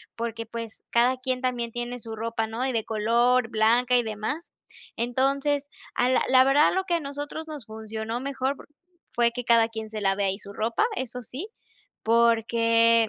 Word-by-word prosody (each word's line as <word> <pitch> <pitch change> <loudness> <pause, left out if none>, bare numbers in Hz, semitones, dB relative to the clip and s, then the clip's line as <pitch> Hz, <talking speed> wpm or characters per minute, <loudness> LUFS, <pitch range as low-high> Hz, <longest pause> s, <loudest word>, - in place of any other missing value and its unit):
Porque, 230 0 -4
pues, 230 -1 -7
cada 245 +2 +3
quien 255 0 -2
también 245 -2 -1
tiene 240 +1 -4
su 225 0 -7
ropa, 225 0 -2
¿no?, 225 +3 -3
y 265 - 0
de 225 -2 -1
color, 235 +2 +2
blanca 240 +3 +3
y 240 - +2
demás. 220 +10 -4 0.4
Entonces, 275 +4 0 0.3
ah, 245 - +2
la 260 - +3
la 255 0 +7
verdad, 285 +3 +5
lo 380 - +1
que 350 - -1
a - - +1
nosotros 290 +3 -6
nos 295 -7 -7
funcionó 220 +1 -5
mejor 275 0 -2
por - - -14 0.4
fue 235 -1 +3
que 245 +1 -5
cada 230 -1 +5
quien 220 -1 -6
se 215 -1 -5
lave 195 0 +1
ahí 195 0 0
su 200 -1 -9
ropa, 230 - 0
eso 250 -1 -4
sí. 305 - -6 0.5
Porque, 230 0 +4
235 Hz, 185 wpm, -26 LUFS, 225-260 Hz, 0.5 s, la